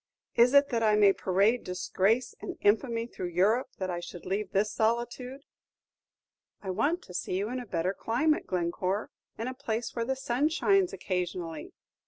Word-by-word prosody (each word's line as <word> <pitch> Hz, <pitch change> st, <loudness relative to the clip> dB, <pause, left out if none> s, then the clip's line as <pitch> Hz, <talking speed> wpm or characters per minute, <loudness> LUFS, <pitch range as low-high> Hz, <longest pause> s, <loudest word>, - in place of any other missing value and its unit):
Is 245 Hz, +4 st, +5 dB
it 280 Hz, 0 st, +6 dB
that 235 Hz, -3 st, 0 dB
I 215 Hz, -1 st, +4 dB
may 205 Hz, -2 st, +6 dB
parade 200 Hz, +7 st, +2 dB
disgrace 200 Hz, +6 st, 0 dB
and -, -, -6 dB
infamy 230 Hz, +2 st, +2 dB
through 185 Hz, -6 st, -6 dB
Europe 200 Hz, +9 st, +2 dB
that 185 Hz, -1 st, -2 dB
I 175 Hz, -, -3 dB
should 175 Hz, 0 st, -9 dB
leave 195 Hz, +1 st, -2 dB
this 200 Hz, +2 st, +1 dB
solitude?" 240 Hz, +4 st, -1 dB, 1.2 s
"I 190 Hz, -, -4 dB
want 315 Hz, -, 0 dB
to 180 Hz, -, -12 dB
see 180 Hz, +1 st, -2 dB
you 205 Hz, +3 st, -1 dB
in 255 Hz, -, -2 dB
a 245 Hz, -, -8 dB
better 180 Hz, +1 st, -1 dB
climate, 300 Hz, +10 st, 0 dB
Glencore, 185 Hz, +3 st, -1 dB, 0.3 s
in 225 Hz, -, -3 dB
a 255 Hz, -, -3 dB
place 240 Hz, -3 st, -3 dB
where 235 Hz, -, 0 dB
the 265 Hz, +2 st, -1 dB
sun 265 Hz, +3 st, 0 dB
shines 380 Hz, +3 st, +2 dB
occasionally." 175 Hz, -3 st, -4 dB
220 Hz, 175 wpm, -29 LUFS, 185-250 Hz, 1.2 s, it